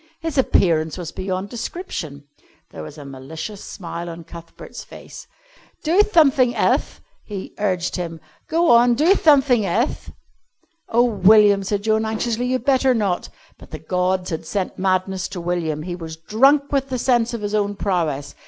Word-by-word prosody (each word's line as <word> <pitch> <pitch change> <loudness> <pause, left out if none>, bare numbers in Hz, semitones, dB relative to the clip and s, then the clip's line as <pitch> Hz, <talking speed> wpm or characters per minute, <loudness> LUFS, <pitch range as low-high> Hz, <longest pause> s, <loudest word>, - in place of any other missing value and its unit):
His 325 -2 -4
appearance 165 - +2
was 175 -3 -6
beyond 190 +1 -4
description. 225 - -6 0.5
There 80 - -8
was 80 - -10
a 145 - -10
malicious 155 +10 -8
smile 170 -2 -7
on 170 0 -8
Cuthbert's 170 0 -11
face. - - -12 0.6
"Do 330 +5 +2
thumthing 275 - +3
elth," - - 0 0.2
he 200 -3 -7
urged 185 -4 -1
him. 165 -2 -5 0.3
"Go 335 +1 +3
on, 240 +1 +5
do 320 +9 +4
thumthing 280 - +4
elth." 210 +8 -1 0.8
"Oh, 235 +1 +3
William," 210 -2 +5
said 200 +1 -2
Joan 220 0 +1
anxiously, 225 +2 -2
"you'd 255 -1 -2
better 265 -2 +3
not." 200 -5 -1 0.3
But - - -15
the 155 - -7
gods 180 +3 -1
had 160 - -5
sent 195 -3 -3
madness 185 0 0
to 180 - -7
William. 170 -3 -2
He 175 +1 -5
was 160 -2 -8
drunk 270 - +2
with 275 -1 0
the 255 - -2
sense 240 -1 +1
of 230 - -6
his 205 0 -4
own 205 -1 0
prowess. 160 -8 -2
200 Hz, 160 wpm, -21 LUFS, 170-245 Hz, 0.8 s, on